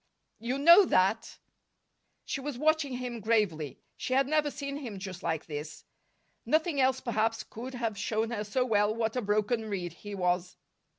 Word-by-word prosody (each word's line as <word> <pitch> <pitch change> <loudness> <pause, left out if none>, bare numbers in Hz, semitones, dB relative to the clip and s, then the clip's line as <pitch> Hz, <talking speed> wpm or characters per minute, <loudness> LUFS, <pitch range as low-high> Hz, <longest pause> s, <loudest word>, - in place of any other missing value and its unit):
"You 245 +4 -2
know 340 +8 +8
that." 195 - +1 0.9
She 275 - -3
was 285 -2 -4
watching 305 -1 +2
him 245 -1 -4
gravely. 200 - 0
She 255 - -3
had 270 +1 +4
never 305 0 +2
seen 280 -1 -5
him 240 -9 -6
just 190 -2 -7
like 160 -2 -2
this. 150 0 -7 0.6
Nothing 315 -2 +1
else, 260 0 +3
perhaps, 225 -2 0
could 250 +4 -8
have 225 -4 -2
shown 220 +2 -1
her 210 -3 -2
so 250 +5 0
well 210 -2 +2
what 225 0 -1
a 250 - 0
broken 215 +2 0
reed 180 -4 -3
he 205 +3 -8
was. 180 -1 -1
225 Hz, 170 wpm, -30 LUFS, 205-265 Hz, 0.9 s, know